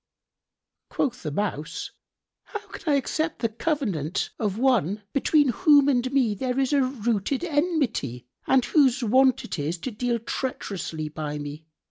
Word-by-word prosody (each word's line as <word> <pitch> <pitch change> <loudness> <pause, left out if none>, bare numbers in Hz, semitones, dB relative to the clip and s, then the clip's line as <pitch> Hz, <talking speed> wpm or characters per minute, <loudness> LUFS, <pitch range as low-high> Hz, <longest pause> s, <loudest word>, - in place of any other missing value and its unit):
Quoth 255 -3 -1
the 155 - -3
Mouse, 155 -2 -3 0.5
"How 420 -2 -7
can 310 - -3
I - - +4
accept 310 +4 -1
the 230 - 0
covenant 215 - -2
of 210 -3 -1
one 215 - +2
between 290 0 +3
whom 285 +1 +5
and 255 -2 +2
me 260 -6 +2
there 250 +5 -2
is 270 +1 +1
a 280 - +4
rooted 245 - -1
enmity, 290 - -1 0.2
and 260 -2 +4
whose 270 -4 +3
wont 260 +3 +4
it - - -5
is 155 +5 -2
to 260 - -3
deal 240 +2 -1
treacherously 195 - -4
by 150 -1 -4
me? 145 +2 -7
245 Hz, 150 wpm, -25 LUFS, 190-275 Hz, 0.5 s, whom